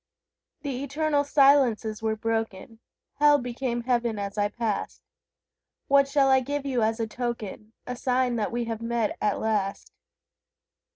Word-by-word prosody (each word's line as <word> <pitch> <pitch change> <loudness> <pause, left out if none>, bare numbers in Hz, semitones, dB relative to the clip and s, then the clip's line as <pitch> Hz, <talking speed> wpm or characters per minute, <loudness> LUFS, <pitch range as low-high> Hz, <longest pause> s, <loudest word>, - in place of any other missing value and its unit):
The 275 -2 -3
eternal 290 +1 0
silences 270 -7 +3
were 220 -1 0
broken; 225 -1 -3 0.4
Hell 295 0 +6
became 245 -1 -3
Heaven 235 -3 0
as 200 -1 -4
I 205 -1 +1
passed. 220 -1 -3 0.8
What 280 -1 +5
shall 275 -1 +3
I 265 - +6
give 285 +2 -3
you 260 -4 0
as 220 +1 +1
a 225 - 0
token, 220 -2 -5
A 250 - -4
sign 250 0 0
that 215 - -1
we 240 0 -2
have 225 -1 -4
met, 230 -2 -1
at 205 -2 +1
last? 205 -3 -2
235 Hz, 150 wpm, -26 LUFS, 220-270 Hz, 0.8 s, Hell